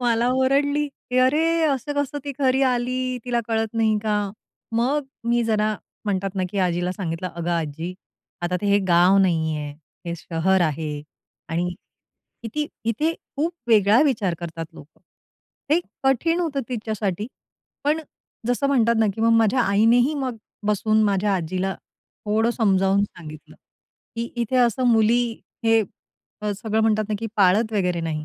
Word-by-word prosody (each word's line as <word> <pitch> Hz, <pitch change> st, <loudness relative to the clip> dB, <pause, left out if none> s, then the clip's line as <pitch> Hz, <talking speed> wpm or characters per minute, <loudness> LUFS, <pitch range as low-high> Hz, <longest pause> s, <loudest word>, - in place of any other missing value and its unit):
मला 235 Hz, 0 st, +2 dB
ओरडली, 280 Hz, +3 st, +2 dB, 0.2 s
की 250 Hz, -, +2 dB
"अरे 265 Hz, +5 st, +4 dB, 0.2 s
असं 285 Hz, -1 st, 0 dB
कसं, 285 Hz, 0 st, -1 dB
ती 285 Hz, -, -3 dB
घरी 265 Hz, -1 st, +2 dB
आली, 255 Hz, 0 st, 0 dB
तिला 240 Hz, -1 st, 0 dB
कळत 225 Hz, 0 st, -1 dB
नाही 220 Hz, -2 st, +2 dB
का?" 205 Hz, -2 st, 0 dB, 0.4 s
मग 240 Hz, +5 st, +1 dB
अ, -, -, -4 dB, 0.3 s
मी 240 Hz, 0 st, +3 dB
जरा 215 Hz, -1 st, +1 dB, 0.3 s
म्हणतात 195 Hz, -2 st, -1 dB
ना, 190 Hz, -, -1 dB
की 200 Hz, -, -3 dB
आजीला 180 Hz, -1 st, 0 dB
सांगितलं, 180 Hz, -1 st, -4 dB
"अगं 170 Hz, 0 st, -2 dB
आजी, 165 Hz, +1 st, -3 dB, 0.5 s
आता 180 Hz, +1 st, 0 dB
ते 205 Hz, -, -2 dB
हे 200 Hz, 0 st, +4 dB
गाव 175 Hz, +2 st, +5 dB
नाही 160 Hz, -5 st, +2 dB
आहे, 150 Hz, -1 st, -5 dB, 0.3 s
हे 170 Hz, -, -2 dB
शहर 170 Hz, +4 st, 0 dB
आहे 150 Hz, -2 st, -1 dB, 0.5 s
आणि 170 Hz, +2 st, -1 dB, 0.7 s
किती 265 Hz, +7 st, -3 dB, 0.2 s
इथे 295 Hz, +9 st, +1 dB, 0.2 s
खूप 320 Hz, +5 st, 0 dB, 0.2 s
वेगळा 215 Hz, 0 st, +5 dB
विचार 215 Hz, -, +1 dB
करतात 165 Hz, -1 st, -5 dB
लोकं." 150 Hz, -, -15 dB, 0.7 s
हे 320 Hz, +3 st, +4 dB, 0.2 s
कठीण 320 Hz, +6 st, +2 dB
होतं 305 Hz, -5 st, -1 dB
तिच्यासाठी, 215 Hz, -4 st, -3 dB, 0.6 s
पण 305 Hz, +2 st, +2 dB, 0.5 s
जसं 245 Hz, +3 st, +1 dB
म्हणतात 235 Hz, -4 st, +3 dB
ना, 220 Hz, -, +4 dB
की 220 Hz, -, -6 dB
मग 230 Hz, +1 st, +4 dB
माझ्या 225 Hz, +3 st, +3 dB
आईनेही 235 Hz, +6 st, +3 dB
मग 260 Hz, -4 st, -3 dB, 0.3 s
बसून 215 Hz, +1 st, +2 dB
माझ्या 200 Hz, -1 st, +2 dB
आजीला 185 Hz, +2 st, -2 dB, 0.5 s
थोडं 220 Hz, +2 st, +2 dB
समजावून 195 Hz, -4 st, +2 dB
सांगितलं, 155 Hz, -6 st, -11 dB, 0.6 s
की 230 Hz, +1 st, -2 dB
इथे 240 Hz, +1 st, 0 dB
असं 250 Hz, 0 st, +3 dB
मुली 230 Hz, +1 st, +4 dB, 0.4 s
हे 225 Hz, 0 st, +4 dB, 0.7 s
सगळं 220 Hz, +2 st, -1 dB
म्हणतात 215 Hz, -1 st, +2 dB
ना, 215 Hz, -, -1 dB
की 225 Hz, -, -3 dB
पाळत 210 Hz, +3 st, +3 dB
वगैरे 180 Hz, -4 st, 0 dB
नाही. 155 Hz, -2 st, -3 dB
220 Hz, 155 wpm, -23 LUFS, 185-245 Hz, 0.7 s, गाव